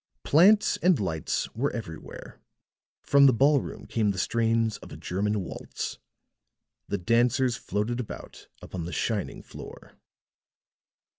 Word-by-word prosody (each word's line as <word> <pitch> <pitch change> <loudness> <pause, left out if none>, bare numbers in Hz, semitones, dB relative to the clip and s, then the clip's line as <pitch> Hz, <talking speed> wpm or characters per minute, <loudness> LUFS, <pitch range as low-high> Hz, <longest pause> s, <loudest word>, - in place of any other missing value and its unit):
Plants 200 +8 +5
and 180 -4 +3
lights 80 -6 -1
were 135 +6 0
everywhere; 95 -10 -8 0.6
from 140 0 +6
the 130 - +5
ballroom 140 +4 +2
came 110 -3 0
the 100 - -2
strains 115 +2 +1
of - - -13
a - - -8
German 105 +3 -1
waltz; - - -6 0.9
the - - -1
dancers 120 +6 +2
floated 110 +4 -2
about 120 - -8 0.2
upon 90 -3 -5
the 90 - -6
shining 110 -4 -2
floor. - - -11
115 Hz, 125 wpm, -27 LUFS, 100-130 Hz, 0.9 s, from